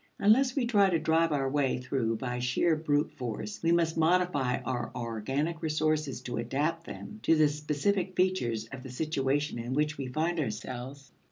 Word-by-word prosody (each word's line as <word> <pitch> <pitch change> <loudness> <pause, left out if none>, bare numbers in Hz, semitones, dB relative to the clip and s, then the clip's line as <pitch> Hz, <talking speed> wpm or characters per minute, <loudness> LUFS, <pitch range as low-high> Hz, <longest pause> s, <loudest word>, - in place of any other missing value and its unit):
Unless 250 +6 +4
we 270 -4 +1
try 205 -5 +4
to 170 - +2
drive 165 +1 +2
our 140 -2 +1
way 135 -2 +1
through 125 -3 -1
by 125 0 -3
sheer 125 +7 +2
brute 150 -1 0
force, 125 - -5
we 165 - +2
must 165 -1 +2
modify 160 -6 +2
our 125 -1 -3
organic 135 +8 -2
resources 155 -2 0
to 120 -1 -5
adapt 150 +8 -1
them 215 - -8
to 165 - +4
the 155 -1 +5
specific 150 +6 -1
features 150 -13 +1
of 130 - -7
the 130 - -9
situation 140 0 -1
in 120 +2 -3
which 150 0 0
we 135 - -3
find 160 +6 -1
ourselves. 130 +1 -5
150 Hz, 175 wpm, -29 LUFS, 130-165 Hz, -, the